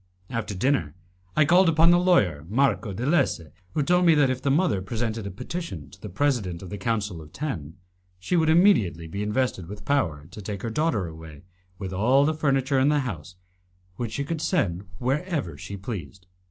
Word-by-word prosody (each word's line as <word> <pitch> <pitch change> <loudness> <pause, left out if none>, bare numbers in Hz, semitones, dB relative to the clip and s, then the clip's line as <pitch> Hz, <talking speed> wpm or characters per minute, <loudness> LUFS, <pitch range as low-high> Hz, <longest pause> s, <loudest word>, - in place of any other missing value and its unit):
After 115 -3 -3
dinner, 95 - 0 0.4
I 155 - +5
called 175 +3 +5
upon 165 +1 +5
the 175 - +5
lawyer, 100 - +3
Marco 120 -2 +1
de 115 +6 -4
Lesse, 145 - +2 0.3
who 150 - +2
told 180 +4 +3
me 165 - +6
that 140 -3 +4
if 130 0 -3
the 140 - 0
mother 150 - +2
presented 110 +1 -3
a - - -3
petition 95 - -6
to 95 - -16
the 105 - -7
President 100 -6 -1
of 90 - -9
the 105 - -4
Council 105 -5 -2
of 75 0 -13
Ten, 90 - -5 0.4
she 95 - -2
would 160 -2 +3
immediately 160 - +4
be 100 +5 -5
invested 105 -4 -1
with 105 +2 -9
power 80 - 0
to 105 - -9
take 100 -1 -6
her 115 - -2
daughter 135 - 0
away 80 -2 -10 0.3
with 95 -1 -5
all 125 +9 +4
the 155 - +2
furniture 135 -3 +1
in 135 +2 +4
the 150 -1 +2
house, 90 - -6 0.6
which 120 -3 -4
she 140 - -1
could 160 +2 -3
send 100 - 0
wherever 140 - -1
she 100 +8 -7
pleased. 95 - -7
115 Hz, 195 wpm, -25 LUFS, 95-145 Hz, 0.6 s, me